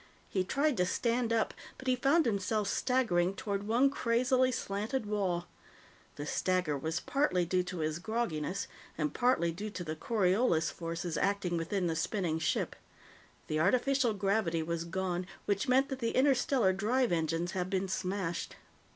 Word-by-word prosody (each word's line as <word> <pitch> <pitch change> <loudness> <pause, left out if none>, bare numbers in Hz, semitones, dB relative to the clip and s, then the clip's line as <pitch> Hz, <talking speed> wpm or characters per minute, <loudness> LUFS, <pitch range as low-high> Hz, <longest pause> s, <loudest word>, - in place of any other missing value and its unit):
He 190 - 0
tried 280 +6 +1
to 180 - +3
stand 235 +3 0
up, 225 -1 +1 0.2
but 260 - -10
he 255 - +4
found 280 +6 +3
himself 210 -1 0
staggering 195 -8 +1
toward 200 0 -3
one 250 +5 +4
crazily 255 +1 +2
slanted 215 +3 -2
wall. 190 -5 -1 0.7
The 145 - -5
stagger 180 -1 0
was 160 +3 -2
partly 185 -11 +1
due 180 +2 +1
to 180 -2 -5
his 155 +1 -1
grogginess, 195 -5 -2 0.3
and 150 -2 -1
partly 245 -9 +2
due 205 +6 -5
to 185 -3 -6
the 155 -2 -4
Coriolis 190 -1 +2
forces 165 -1 -4
acting 200 -3 0
within 175 +3 -1
the 165 -2 0
spinning 165 -2 -1
ship. 160 - 0 0.7
The 155 - -1
artificial 245 - +2
gravity 195 -4 +1
was 170 +1 -3
gone, 180 +1 -2 0.2
which 205 0 0
meant 265 +2 +3
that 270 -2 -4
the 230 -2 -1
interstellar 260 -6 +3
drive 235 +6 +1
engines 165 +1 0
had 185 -1 -2
been 190 0 0
smashed. 185 -2 -3
195 Hz, 160 wpm, -32 LUFS, 175-235 Hz, 0.7 s, he